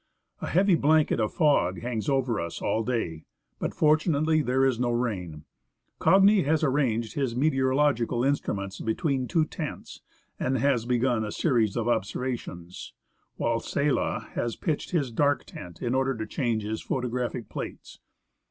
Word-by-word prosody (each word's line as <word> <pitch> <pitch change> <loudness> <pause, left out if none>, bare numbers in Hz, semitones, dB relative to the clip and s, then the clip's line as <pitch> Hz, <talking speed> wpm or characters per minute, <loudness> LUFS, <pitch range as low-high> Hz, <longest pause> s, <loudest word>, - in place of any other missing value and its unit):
A - - -3
heavy 190 +3 +3
blanket 155 -3 +3
of 110 -1 0
fog 150 -4 +2
hangs 115 -2 -3
over 130 -5 +1
us 85 0 -5
all 110 - 0
day, 105 -10 -3 0.3
but, - - -2
fortunately, 155 0 +3
there 130 0 +2
is 130 -3 +1
no 125 -1 +1
rain. 95 -11 -3 0.5
Cagni 195 +1 +5
has 155 +2 +1
arranged 125 -6 +1
his 135 -5 -1
meteorological 130 -3 +2
instruments 100 -8 -1
between 130 +3 -1
two 160 +2 +2
tents, 155 -1 -7 0.4
and 130 +1 0
has 125 -2 +1
begun 120 -2 +1
a 105 - -4
series 115 - +1
of 120 -1 -1
observations, 100 -6 -3 0.4
while 115 0 0
Sella 140 +2 -1
has 120 -1 -2
pitched 155 -4 -2
his 145 -9 0
dark 145 +4 +1
tent 85 -1 -10
in 120 - 0
order 135 0 +1
to 110 - -3
change 115 -5 -1
his 110 +1 -3
photographic 125 -2 -3
plates. - - -7
125 Hz, 150 wpm, -27 LUFS, 115-145 Hz, 0.5 s, Cagni